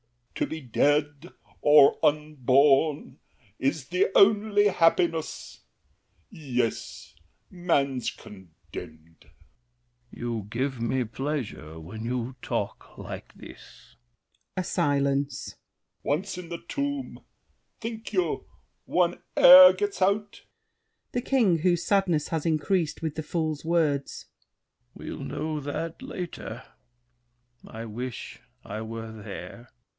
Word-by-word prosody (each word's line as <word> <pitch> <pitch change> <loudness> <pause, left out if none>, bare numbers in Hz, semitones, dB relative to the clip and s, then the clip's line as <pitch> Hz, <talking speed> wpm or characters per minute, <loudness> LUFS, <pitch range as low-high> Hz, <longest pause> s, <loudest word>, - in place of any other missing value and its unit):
L'ANGELY. - - -2
To - - -14
be - - -15
dead 145 +3 +1 0.3
or 145 -1 +6
unborn 145 -1 +2 0.4
is 135 0 -1
The 180 +2 +2
only 205 0 +5
happiness. 165 -2 0 0.7
Yes, 125 -7 -3 0.4
man's 140 - 0
condemned! 95 -4 -13 0.2
THE - - -4
KING. 80 +1 -14 0.9
You 115 -4 -5
give 130 +2 -2
me 125 +2 0
pleasure 115 - -5
when 100 +8 -8
you 125 +1 -3
talk - - -4
like - - -8
this! - - -15 0.6
[A 185 - 0
silence. 140 -3 -1 0.5
L'ANGELY. 145 - +2
Once 195 +2 -7
in 175 -2 -9
the 170 -1 -6
tomb, 285 -1 -4 0.6
think 225 -1 -6
you 180 -6 -1 0.4
one 175 -1 +1 0.2
e'er 275 0 +10
gets 410 -1 -3
out? 200 +2 0 0.7
THE 245 - -1
KING 230 -10 +2
(whose 175 +1 +2
sadness 185 -7 +1
has 160 0 -2
increased 165 +1 0
with 160 -2 -2
the 155 - -4
Fool's 155 -1 -2
words). 160 -4 0 0.7
We'll - - -7
know 155 0 -3
that 160 - -5
later. 180 -10 -7 1.0
I 115 +1 -7
wish 120 +3 -6 0.3
I 110 - -5
were 115 0 -6
there! 110 +2 -9
150 Hz, 110 wpm, -27 LUFS, 125-180 Hz, 1.0 s, e'er